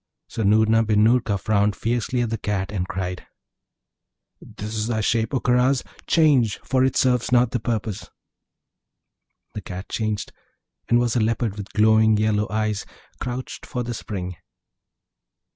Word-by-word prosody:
So - - -5
Noorna 110 +2 +4
bin 105 -1 +3
Noorka 110 -3 +2
frowned 105 +1 +1
fiercely 120 +2 -1
at 120 -2 -1
the 115 - -1
Cat, 100 -2 -2
and 95 -3 -2
cried, 90 -1 -4 1.1
'This 105 +2 -8
is 110 0 -2
thy 115 -2 -1
shape, 110 +1 0
O 130 - 0
Karaz; 125 +2 +2 0.2
change! 135 - +3
for 130 -1 +1
it 130 - +1
serves 125 -2 +2
not 120 -1 +4
the 120 - -1
purpose.' 110 -2 -3 1.4
The - - -5
Cat 95 +2 -8
changed, 110 -2 -2 0.6
and 120 - +5
was 120 0 +1
a - - +3
Leopard 110 -1 0
with 105 -1 -8
glowing 110 0 +4
yellow 105 -1 +1
eyes, 110 0 -1 0.4
crouched 125 +1 -5
for 125 - -4
the 120 0 -4
spring. 90 -6 -6
110 Hz, 150 wpm, -23 LUFS, 105-120 Hz, 1.4 s, and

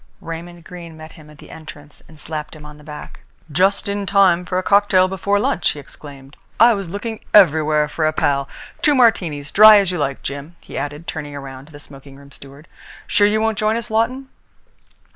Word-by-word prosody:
Raymond 170 +1 -9
Greene 170 -2 -11
met 155 0 -12
him 155 -1 -16
at 150 - -16
the - - -15
entrance 150 -2 -12
and 155 -1 -17
slapped 155 0 -7
him 150 -1 -13
on 150 0 -13
the - - -16
back: 150 0 -11 0.3
"Just 190 +7 +1
in 200 0 -3
time 185 -3 +3
for 180 +1 -3
a 185 - -1
cocktail 200 -2 +3
before 195 +2 -1
lunch!" 175 - 0
he 150 - -4
exclaimed. 140 0 -13 0.2
"I 235 +2 +6
was 195 -4 -5
looking 215 +4 -6 0.2
everywhere 155 -5 +4
for 155 +1 -2
a - - +1
pal. 140 -3 -1 0.3
Two 295 - +3
Martinis, 170 - +1
dry 215 +1 +8
as 195 -3 +1
you 180 - -4
like, 140 -2 -3
Jim," 140 +4 -7
he - - -13
added, 145 +3 -5
turning 145 -3 -6
round 135 0 -10
to - - -18
the 145 - -12
smoking 135 -1 -14
room 140 0 -16
steward. 140 +4 -14 0.4
"Sure 205 - +3
you 215 +1 0
won't 220 -1 -1
join 215 +1 +1
us, 235 0 -5
Lawton?" 255 +5 -1
165 Hz, 205 wpm, -19 LUFS, 145-200 Hz, 0.4 s, dry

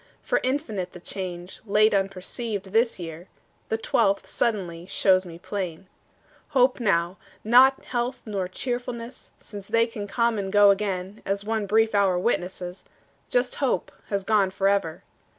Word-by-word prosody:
For - - +1
infinite 225 - -2
The 180 - -9
change, 180 -1 -7
late 215 0 +3
unperceived, 195 +1 -2
this 230 +1 +3
year, 170 0 -8 0.4
The 220 - +1
twelfth, 200 -3 +1
suddenly, 180 -7 -2
shows 185 -1 +3
me 165 -1 -9
plain. 185 -1 -5 0.7
Hope 255 +1 +4
now, 180 -4 +1 0.3
not 255 +4 +5
health 245 +1 -2
nor 200 -4 -2
cheerfulness, 240 +3 -5
Since 200 -2 -10
they 230 0 +3
can 215 -3 -6
come 235 +1 +1
and 195 -1 -3
go 205 0 +7
again, 195 0 -2
As 200 +1 -1
often 205 - -9
one 220 -2 0
brief 220 +2 +3
hour 195 -3 +3
witnesses, 180 -2 -2 0.5
Just 245 0 +1
hope 215 -8 0 0.2
has 200 -2 -1
gone 205 -2 +3
forever. 195 -2 0
200 Hz, 150 wpm, -25 LUFS, 185-230 Hz, 0.7 s, go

